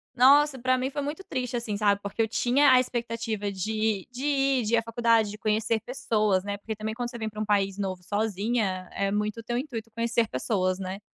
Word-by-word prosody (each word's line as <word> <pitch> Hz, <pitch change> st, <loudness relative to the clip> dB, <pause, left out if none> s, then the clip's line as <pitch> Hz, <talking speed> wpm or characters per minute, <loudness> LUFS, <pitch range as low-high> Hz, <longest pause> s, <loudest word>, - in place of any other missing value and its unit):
nossa 275 Hz, +2 st, +5 dB
pra 255 Hz, +1 st, +2 dB
mim 260 Hz, +1 st, -1 dB
foi 290 Hz, -, -3 dB
muito 300 Hz, +7 st, -4 dB
triste 250 Hz, -4 st, -3 dB
assim, 220 Hz, -3 st, -3 dB
sabe, 200 Hz, -1 st, +2 dB
porque 200 Hz, +3 st, -2 dB
eu 220 Hz, -, +2 dB
tinha 260 Hz, +5 st, +3 dB
a 255 Hz, -, +7 dB
expectativa 230 Hz, -4 st, -2 dB
de 215 Hz, +1 st, -1 dB
de 250 Hz, +3 st, -7 dB
ir, 275 Hz, -3 st, +2 dB
de 225 Hz, -, -2 dB
ir -, -, +3 dB
à -, -, +3 dB
faculdade, 230 Hz, -2 st, +2 dB
de 210 Hz, -, -8 dB
conhecer 220 Hz, +1 st, 0 dB
pessoas, 215 Hz, -6 st, 0 dB
né, 200 Hz, 0 st, -3 dB
porque 220 Hz, +1 st, -6 dB
também 215 Hz, +1 st, -4 dB
quando 240 Hz, +1 st, -3 dB
você 240 Hz, -, -8 dB
vem 220 Hz, -1 st, -3 dB
pra 215 Hz, 0 st, -6 dB
um -, -, -1 dB
país 200 Hz, -1 st, +1 dB
novo 185 Hz, -2 st, -3 dB
sozinha, 205 Hz, -2 st, -1 dB
é 200 Hz, 0 st, 0 dB
muito 210 Hz, +2 st, -1 dB
o -, -, -8 dB
teu 240 Hz, +1 st, -2 dB
intuito 235 Hz, -5 st, -5 dB
conhecer 230 Hz, -1 st, +1 dB
pessoas, 185 Hz, -, 0 dB
né, 190 Hz, +1 st, -5 dB
225 Hz, 225 wpm, -27 LUFS, 205-245 Hz, -, a